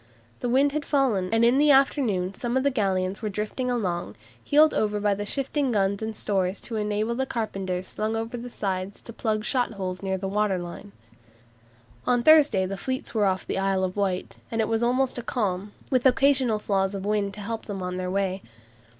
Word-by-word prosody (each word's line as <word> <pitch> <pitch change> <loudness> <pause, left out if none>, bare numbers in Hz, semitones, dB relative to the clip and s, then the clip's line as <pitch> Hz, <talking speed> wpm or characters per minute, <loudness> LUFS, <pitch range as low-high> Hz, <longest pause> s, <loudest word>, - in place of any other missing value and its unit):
The 245 - -2
wind 275 +3 +4
had 300 +1 -2
fallen, 250 -11 +1
and 225 +1 +4
in 245 +3 +4
the 300 +1 +4
afternoon 250 -9 +3
some 240 +4 -2
of 260 - +1
the 280 - +2
galleons 190 -5 0
were 215 - -2
drifting 215 +5 -3
along, 180 - -2 0.3
heeled 305 +2 +5
over 210 -1 0
by 205 0 0
shifting 275 +3 -1
guns 200 -1 +1
and 220 0 -3
stores 195 -2 -1
to 230 - -6
enable 210 +1 -1
the 265 +2 -2
carpenters 190 -6 -3
slung 215 +1 -2
over 225 +2 -3
the 245 +1 -6
sides 195 -3 -3
to 230 - -9
plug 215 -1 -1
shot 245 -3 0
holes 185 -2 -4
near 190 -1 -1
the 195 +1 -4
waterline. 195 -1 -2 1.2
On 245 -1 +3
Thursday 295 -11 +6
the 195 +1 -4
fleets 260 +5 -4
were 215 -3 +2
off 190 -1 0
the - - -2
Isle 195 -1 +1
of 185 0 -2
Wight, 195 -3 -2
and 225 - -3
it 220 - +2
was 225 0 0
almost 250 +1 +1
a - - -3
calm, 205 -5 -2 0.2
with 255 0 +4
occasional 260 -3 +3
flaws 195 -1 0
of 195 0 -5
wind 205 -2 0
to 210 - -8
help 225 +2 -5
them 195 -3 -5
on 180 0 -3
their 185 0 -3
way. 195 0 -1
210 Hz, 200 wpm, -26 LUFS, 195-245 Hz, 1.2 s, Thursday